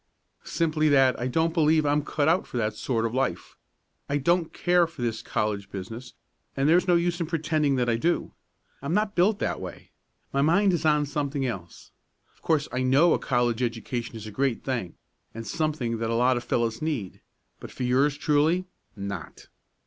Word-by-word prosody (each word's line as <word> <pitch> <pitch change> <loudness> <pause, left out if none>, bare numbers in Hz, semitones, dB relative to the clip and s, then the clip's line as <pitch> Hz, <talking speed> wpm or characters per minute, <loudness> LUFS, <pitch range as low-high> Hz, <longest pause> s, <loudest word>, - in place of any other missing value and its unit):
"Simply 155 -2 +1
that 135 -3 +4
I 125 - -1
don't 160 +5 +1
believe 155 -2 +3
I'm 145 +1 +2
cut 145 0 -1
out 170 +4 +2
for - - -5
that 110 -2 0
sort 115 +1 -1
of 115 - -2
life. 135 +1 -2 0.5
I 140 - +1
don't 170 +3 +1
care 175 -1 +2
for 160 -7 -8
this 115 -1 -2
college 105 -2 -2
business, 115 +6 -8 0.4
and 135 +1 +2
there's 175 +4 +4
no 175 - +5
use 175 +1 0
pretending 155 -3 0
that 125 -2 0
I 115 -1 +2
do. 170 +9 0 0.5
I'm 140 +5 -1
not 210 0 +1
built 200 +4 +3
that - - -2
way. - - -9 0.4
My 140 - +2
mind 185 +6 +3
is 165 -2 -1
on 150 -1 +3
something 140 -1 -2
else. 90 -9 -6 0.4
Of - - -31
course 155 -3 +1
I 125 - -1
know 140 +7 +4
a - - +1
college 120 -2 0
education 120 0 -3
is 110 -1 -7
a 110 - -7
great 130 +1 -1
thing, 120 -10 -3 0.4
and 115 0 -6
something 140 -4 -2
that 115 0 -2
lots 125 +2 +3
of 120 - -4
fellows 115 -1 -1
need. 145 - -3 0.4
But - - -9
for - - -6
yours 135 +4 +2
truly 155 +5 +2 0.3
not!" 100 -5 -7
140 Hz, 185 wpm, -26 LUFS, 120-160 Hz, 0.5 s, no